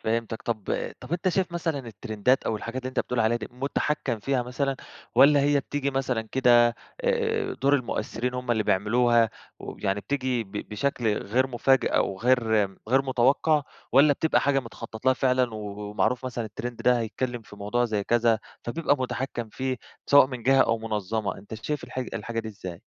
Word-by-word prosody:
فهمتك، 115 0 -2
طب 110 -4 -3 0.4
طب 130 +6 -9
أنت 180 +2 +1
شايف 185 -1 0
مثلًا 165 -4 -1
الترندات 115 +1 -1
أو 110 - 0
الحاجات 120 +4 -5
اللي 130 - -3
أنت 130 - 0
بتقول 125 -1 -2
عليها 115 +1 +3
دي 110 - -7
مُتحكَّم 130 -1 -1
فيها 130 +3 0
مثلًا، 135 +2 -2 0.4
والّا 145 0 +7
هي 145 0 +3
بتيجي 140 0 -2
مثلًا 130 -4 -1
كده 120 -2 +5 0.4
آآ، 450 -4 0
دُور 140 +1 +4
المؤثرين 125 -1 -2
هُم 125 -1 -3
اللي 110 -2 +2
بيعملوها 115 +3 +3 0.3
ويعني 100 +1 -3
بتيجي 130 -1 -1
ب 95 - -20 0.2
بشكل 110 -1 0
غير 125 +6 +1
مفاجئ 130 +1 +2
أو 95 - +1
غير 125 +2 +3 0.5
غير 135 +3 +4
متوقَّع، 135 +4 +2 0.3
والّا 145 +3 +6
بتبقى 160 +3 +2
حاجة 135 -1 +2
متخطط 115 -1 -10
لها 130 - +6
فعلًا 125 -2 +1
و - - -4 0.3
ومعروف 125 +4 0
مثلًا 125 -2 -3
الترند 115 +3 -6
ده 125 -1 +4
هيتكلم 120 +1 -3
في 105 - -14
موضوع 115 +5 0
زي 105 -3 -1
كذا، 115 -1 +3 0.3
فبيبقى 145 +3 +1
مُتحكَّم 125 -2 -3
فيه 130 +4 -3 0.3
سواء 140 -2 +7
من 125 -3 -7
جهة 135 +2 +4
أو 115 0 +1
منظَّمة، 110 -1 -2
أنت 105 +2 -9
شايف 145 +5 -4
الح 125 +1 -7
الحاجة 115 -2 -3
دي 110 - -7
إزاي؟ 95 -5 -8
125 Hz, 180 wpm, -26 LUFS, 115-135 Hz, 0.5 s, والّا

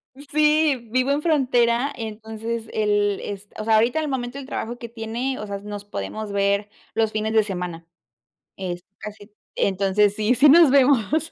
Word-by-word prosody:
Sí, 300 -2 +1
vivo 255 +3 +1
en 290 +1 +1
frontera, 255 -4 +2
entonces 225 0 -5
el 205 -2 +1
es 205 0 -7
o - - -3
sea, 220 0 +4
ahorita 235 +7 +3
al 310 - -2
momento 255 -2 -3
del 265 - -9
trabajo 240 -2 -4
que 235 -2 -8
tiene, 235 +3 -4
o 210 - -5
sea, 200 -1 -5
nos 205 0 -8
podemos 205 - -5
ver 200 +1 0 0.3
los 220 -1 +1
fines 220 0 -2
de 220 -1 +4
semana, 180 -4 -5 0.7
es 180 -2 -5 0.2
casi, 210 0 -10 0.3
entonces 200 +1 +2
sí 215 +3 +2
sí 275 +4 +5
nos 325 0 +7
vemos, 280 +3 +3
225 Hz, 170 wpm, -23 LUFS, 205-260 Hz, 0.7 s, nos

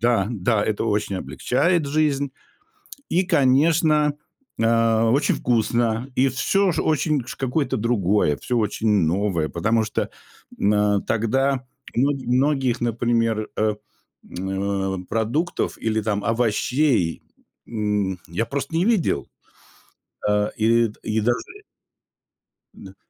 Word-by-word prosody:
Да, 115 -3 +2
да, 105 0 0
это 110 +1 -1
очень 105 -3 -1
облегчает 130 - 0
жизнь. 145 -2 0 0.8
И, 180 +2 +2
конечно, 150 0 +3 0.4
э, 115 0 +3
очень 130 +6 +2
вкусно, 120 +1 0
и 135 +1 +4
всё 190 +9 +1
ш 160 - -1
очень 150 -3 +1
ш - - -7
какое-то 135 +1 -1
другое, 105 - +1
всё 125 - -2
очень 110 +1 -1
новое, 95 -3 +1
потому 110 +9 +1
что, 105 - -3 0.5
м, 105 +1 +2
э, 105 -1 +2
тогда, 130 +4 0 0.3
ну, 135 +5 +2
м 140 - -5
многих, 130 -1 +1
например, 115 -2 0
э, 105 -1 +1 0.6
м, 95 0 -2
продуктов 120 +10 -1
или 110 -1 0
там 105 -1 -1
овощей, 115 - +1 0.4
м, 105 -4 -1
я 100 +7 -2
просто 140 +3 -4
не 175 - +2
видел. 220 -8 +1 1.0
Э, 105 0 +2
и 115 +1 +3
д 105 - -14
и 110 0 -1
даже 120 +3 +1 1.4
н - - -12
115 Hz, 120 wpm, -22 LUFS, 105-135 Hz, 1.4 s, и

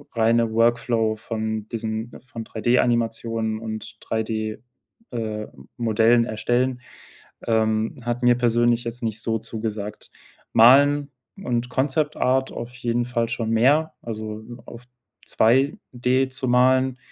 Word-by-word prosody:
reine 115 0 +2
Workflow 115 -1 +2
von 110 -1 -4
diesen 110 0 -4
von 125 -4 -7
3D-Animationen 115 -1 0
und 110 -1 -7
3D 110 -1 -2 0.5
äh, 110 -3 -3 0.3
Modellen 115 +1 +3
erstellen, 120 +3 -1 0.7
ähm, 110 -1 +1
hat 120 +1 -3
mir 120 0 +6
persönlich 120 0 +2
jetzt 120 +1 -6
nicht 110 -1 -2
so 115 0 0
zugesagt. 110 -2 -6 0.4
Malen 140 +4 +6 0.3
und 125 -9 -2
Concept-Art 135 -1 0
auf 120 +1 -7
jeden 120 -1 -1
Fall 120 -2 -1
schon 115 -1 -2
mehr, 140 +8 +3
also 110 -1 -6
m 120 +2 -11
auf 120 0 -11 0.4
2D 130 +1 +1
zu 130 0 -4
malen, 130 +1 +3
115 Hz, 115 wpm, -23 LUFS, 110-125 Hz, 0.7 s, mir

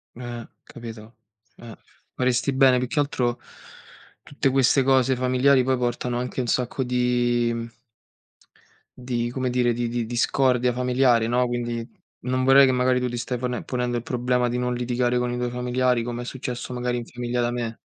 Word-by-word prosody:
Eh, 120 -1 -7 0.2
capito. 115 -1 -11 0.4
Eh, 115 -2 -11 0.4
faresti 130 +2 +1
bene, 130 -1 +5
più 125 - -1
che 150 +4 0
altro 125 -4 -1 0.8
tutte 140 -1 -1
queste 135 +1 +3
cose 130 -1 +3
familiari 130 +1 +3
poi 130 0 +1
portano 120 0 -2
anche 125 +1 -3
un 125 - -2
sacco 125 +2 -1
di, 120 -1 +1
mhmm 115 0 -6 1.3
di 120 -1 -2
come 130 0 -2
dire 125 -1 +1
di 120 0 -2
di 120 0 -2
discordia 125 +1 +1
familiare, 125 -2 +2
no, 125 +2 +1
quindi 120 -1 -3 0.4
non 130 0 0
vorrei 135 +1 +7
che 130 - +2
magari 125 0 +2
tu 125 - -1
ti 120 - -5
stai 125 +1 -3
pone 125 0 -3
ponendo 125 -1 -2
il 120 - -3
problema 125 0 0
di 125 - -2
non 125 0 -1
litigare 125 0 0
con 125 0 -1
i 125 - -3
tuoi 125 0 -1
familiari, 125 0 0
come 120 0 -4
è - - -6
successo 125 -1 -5
magari 125 0 -2
in 120 - -6
famiglia 120 0 -3
da 120 - +1
me. 120 -2 -4
125 Hz, 180 wpm, -24 LUFS, 120-125 Hz, 1.3 s, vorrei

